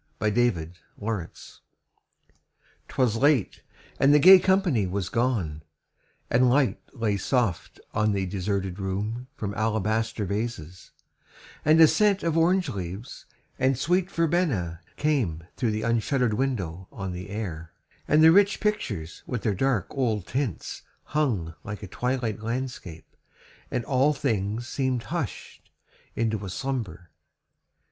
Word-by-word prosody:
THE 105 - 0
DECLARATION. 100 -2 -3 1.3
'Twas 120 -4 +1
late, 140 -4 +2 0.4
and 135 - +5
the 145 - +7
gay 185 +5 +9
company 180 - +2
was 95 0 -2
gone, 110 -11 -1 0.7
And 125 +1 +3
light 130 -5 +2
lay 110 -6 -1
soft 105 -4 -1
on 105 0 +2
the 100 -1 0
deserted 95 0 -2
room 105 +6 -3
From 105 -8 -4
alabaster 110 0 0
vases, 100 -4 -4 0.7
and 155 +2 +5
a 160 - +9
scent 205 +3 +2
Of 165 -2 0
orange 175 +1 +3
leaves, 95 +2 -7 0.3
and 130 0 +2
sweet 180 +7 +1
verbena 150 - 0 0.2
came 120 - 0
Through 120 - 0
the 110 0 -2
unshutter'd 115 +1 +1
window 95 -8 -2
on 95 -3 -5
the 90 +1 -7
air, 85 -6 -5 0.4
And 155 +1 +5
the 160 - +9
rich 200 +3 +4
pictures 110 - -2
with 120 -4 -3
their 105 - +1
dark 115 -2 +1
old 110 -8 -1
tints 125 - -3 0.2
Hung 115 - -1
like 105 -1 -7
a - - -6
twilight 125 +1 -2
landscape, 115 -8 -5 0.5
and 120 - -2
all 135 +3 +3
things 115 -4 -2
Seem'd 130 -3 -1
hush'd 165 -5 -5 0.5
into 110 -2 -1
a 95 - -5
slumber. 95 -7 -4
115 Hz, 130 wpm, -26 LUFS, 95-135 Hz, 1.3 s, gay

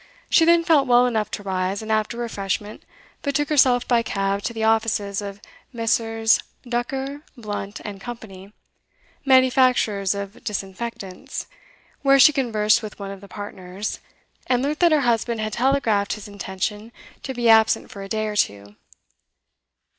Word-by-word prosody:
She 325 - +6
then 340 0 +5
felt 310 -5 +3
well 245 0 +5
enough 220 -4 0
to 205 - -6
rise, 190 +1 -2
and 220 - -4
after 215 +2 0
refreshment 210 -3 -4 0.4
betook 290 +1 -1
herself 260 -5 +4
by 240 -2 +3
cab 195 -2 -1
to - - -1
the 225 -1 -4
offices 220 -2 +1
of 200 0 -7 0.3
Messrs 225 -1 +1 0.3
Ducker, 265 +4 -3 0.2
Blunt 205 -2 -6
& 200 -1 -9
Co., 240 +4 -6 1.1
manufacturers 255 -7 +3
of 200 +3 -7
disinfectants, 195 -1 -5 0.6
where 275 -1 +5
she 285 +3 +7
conversed 220 -6 +2
with 215 -2 -8
one 195 -1 -6
of 195 -1 -9
the 200 - -12
partners, 195 0 -6 0.5
and 250 0 +1
learnt 295 +2 -1
that 345 -2 +5
her 305 -2 +4
husband 235 -2 0
had 215 -1 -3
telegraphed 235 -5 +1
his 210 -1 -8
intention 205 +2 -5 0.3
to 265 - -6
be 240 -1 0
absent 220 0 +4
for 200 - -9
a 195 - -8
day 215 +1 -1
or 210 -1 -3
two. 100 - -1
220 Hz, 155 wpm, -23 LUFS, 200-250 Hz, 1.1 s, she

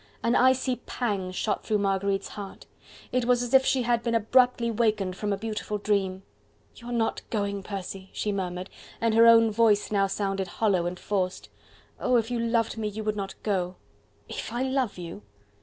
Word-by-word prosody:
An 235 +1 +2
icy 260 0 +3
pang 200 -7 -2
shot 205 +3 -2
through 215 - +1
Marguerite's 195 0 0
heart. 200 -2 -9 0.5
It 250 -1 +1
was 245 0 +3
as 245 +1 -5
if 265 0 +7
she 260 -1 +2
had 240 -1 +1
been 235 -1 -1
abruptly 235 +1 +3
wakened 210 -5 0
from 210 +2 -2
a 200 - 0
beautiful 210 0 -3
dream. 195 -2 -1 0.5
"You 235 - -12
are - - -4
not 230 -2 0
going, 200 -2 -1
Percy!" 195 -1 -6
she 210 - -2
murmured, 185 -1 -4 0.3
and 230 -1 +1
her 230 +1 +7
own 230 -1 +7
voice 215 -2 +3
now 200 -1 +3
sounded 195 -1 -2
hollow 185 -2 +1
and 180 +1 -5
forced. 185 -2 -2 0.5
"Oh! 250 - +2
if 230 0 +1
you 240 - 0
loved 230 -1 0
me 215 - -1
you 215 +1 -5
would 215 0 -1
not 195 -2 -4
go!" 185 -3 -1 0.5
"If - - -6
I 240 +2 -1
love 260 -5 -1
you!" 170 -10 -7
210 Hz, 190 wpm, -27 LUFS, 195-235 Hz, 0.5 s, if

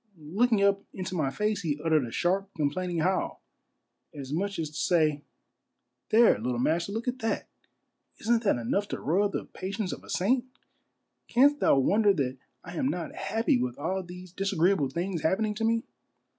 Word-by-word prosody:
Looking 200 +8 +1
up 200 0 +3
into 185 0 -4
my 155 -6 0
face, 210 +7 -1
he 150 -5 -2
uttered 155 -4 +2
a - - -8
sharp, 190 +6 0
complaining 165 +3 -1
howl, 185 +3 -1 0.7
as 140 -1 -6
much 195 +4 -1
as 155 -2 -3
to - - -15
say, 155 -4 +2 0.4
" - - -54
There, 225 - +5
little 120 +2 -2
master, 165 +9 0
look 225 +4 -4
at 250 +1 -1
that. 225 -2 -2 0.7
Isn't 230 0 +1
that 200 - +3
enough 120 - -1
to - - -4
roil 195 +7 +1
the - - -4
patience 195 +1 -4
of - - -9
a - - -15
saint? 245 +7 +1 0.8
Canst 285 +4 +4
thou - - +4
wonder 205 +9 +4
that 135 -6 -2 0.2
I - - -8
am 265 - +1
not 175 - -3
happy 225 - 0
with 125 -1 -2
all 185 +6 -2
these 180 0 -10
disagreeable 190 -5 +1
things 170 +3 -3
happening 210 +7 +1
to 220 +2 -4
me 230 +1 +2
185 Hz, 180 wpm, -28 LUFS, 155-210 Hz, 0.8 s, There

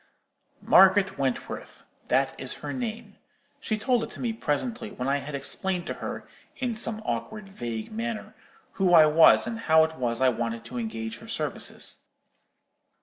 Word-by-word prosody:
"Margaret 190 -3 +5
Wentworth,—that 135 -2 -2
is - - -2
her - - -3
name. 235 -3 -5 0.4
She 215 - -2
told 240 +1 +1
it - - -8
me 235 -2 -2
presently, 225 - -2
when 125 -10 -5
I 140 +1 +2
had 145 +1 -6
explained 140 +7 -1
to - - -3
her, - - -5 0.3
in 250 -3 -1
some 220 -1 -2
awkward 215 -2 -4
vague 120 - -6
manner, 225 -1 -4 0.5
who 180 -2 +5
I 160 -2 +9
was, 155 +6 +6
and 225 0 -4
how 160 -7 +5
it 160 0 -2
was 120 -2 -1
I 130 0 +4
wanted 115 -1 -3
to 120 +1 -5
engage 110 0 -5
her - - -13
services. - - -3
175 Hz, 155 wpm, -27 LUFS, 130-220 Hz, 0.5 s, I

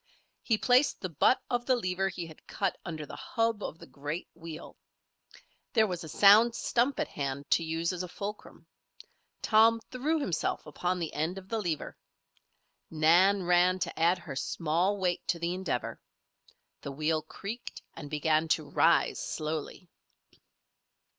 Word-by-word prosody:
He 225 - +1
placed 250 +5 +3
the 185 - -4
butt 250 - +4
of 245 -1 -2
the 260 - +4
lever 195 -4 -1
he 175 -2 -6
had 160 -1 -14
cut 195 -2 -1
under 155 -3 -5
the - - -9
hub 225 -2 -1
of 160 - -5
the - - -12
great 145 +5 -6
wheel. 165 -1 -9 1.0
There 220 -4 +5
was 180 -4 -4
a 160 - -8
sound 215 +7 +6
stump 250 +4 0
at - - 0
hand 140 0 -5
to 165 - +4
use 165 +2 -1
as 180 - -4
a 180 - -4
fulcrum. 205 +3 -8 0.8
Tom 225 +1 +5
threw 295 +6 0
himself 185 - -2
upon 180 +5 -2
the 165 -3 -4
end 160 +5 -2
of 190 0 -10
the 225 - -1
lever. 165 -6 -3 0.9
Nan 175 +5 +4
ran 180 +1 +4
to 185 - -4
add 170 +3 +4
her 170 -6 -8
small 170 +8 0
weight 180 -3 0
to 175 - +1
the 170 +1 -2
endeavor. 180 -9 -3 0.8
The 140 - -6
wheel 155 +2 0
creaked 200 +9 -8
and 145 - -9
began 155 +1 +1
to - - 0
rise - - +3
slowly. 155 +3 -4
180 Hz, 160 wpm, -30 LUFS, 160-205 Hz, 1.0 s, sound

